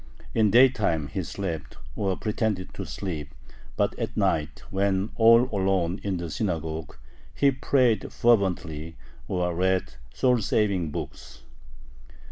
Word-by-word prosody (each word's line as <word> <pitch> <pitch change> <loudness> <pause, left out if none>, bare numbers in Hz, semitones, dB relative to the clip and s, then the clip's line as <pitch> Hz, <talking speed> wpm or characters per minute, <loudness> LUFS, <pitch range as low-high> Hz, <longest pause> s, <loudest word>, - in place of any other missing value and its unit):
In 110 -2 +3
daytime 105 - +4
he - - -3
slept, 85 -7 -5 0.2
or 95 -2 -1
pretended 105 -3 -2
to - - -6
sleep, 75 -7 -5 0.4
but - - +1
at - - -4
night, 75 -2 0
when 95 +1 0
all 115 +1 +7
alone 95 -2 +1
in 100 -2 -2
the 85 -2 -5
synagogue, 80 -3 -3 0.4
he 140 -1 +4
prayed 130 -3 +1
fervently, 85 -8 +1 0.3
or 90 -1 -1
read 95 +2 0 0.2
soul 125 -3 +2
saving 100 -5 +1
books. 75 - -8
95 Hz, 120 wpm, -26 LUFS, 85-110 Hz, 0.4 s, all